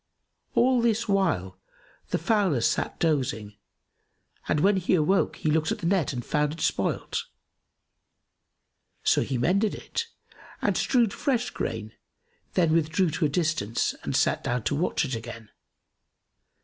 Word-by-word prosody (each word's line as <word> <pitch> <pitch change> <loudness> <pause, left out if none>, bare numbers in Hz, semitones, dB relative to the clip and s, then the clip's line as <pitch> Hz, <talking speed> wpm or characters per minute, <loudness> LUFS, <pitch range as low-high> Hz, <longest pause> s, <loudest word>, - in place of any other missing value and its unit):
All 250 0 +4
this 230 0 +1
while, 165 - 0 0.5
the - - +1
fowler 190 - +1
sat - - 0
dozing, 125 -10 -1 0.9
and 150 - +2
when 195 +5 +4
he 185 0 +2
awoke, 180 +4 +2
he 155 - -1
looked 155 0 +1
at - - -1
the - - -6
net 170 -3 +2
and 125 -3 -5
found 150 0 0
it 165 - -10
spoilt. - - -1 1.8
So - - +3
he 130 - -2
mended 195 - +1
it 460 -1 -4 0.5
and - - +1
strewed 235 -6 +2
fresh 245 -3 -1
grain, 110 -1 -4 0.6
then 165 -3 +3
withdrew 160 +2 +2
to 160 +1 0
a - - +2
distance 150 - 0
and - - -3
sat - - +2
down 120 -1 -1
to 115 - 0
watch 160 +1 0
it 135 - -4
again. 115 -1 -8
160 Hz, 145 wpm, -26 LUFS, 125-195 Hz, 1.8 s, All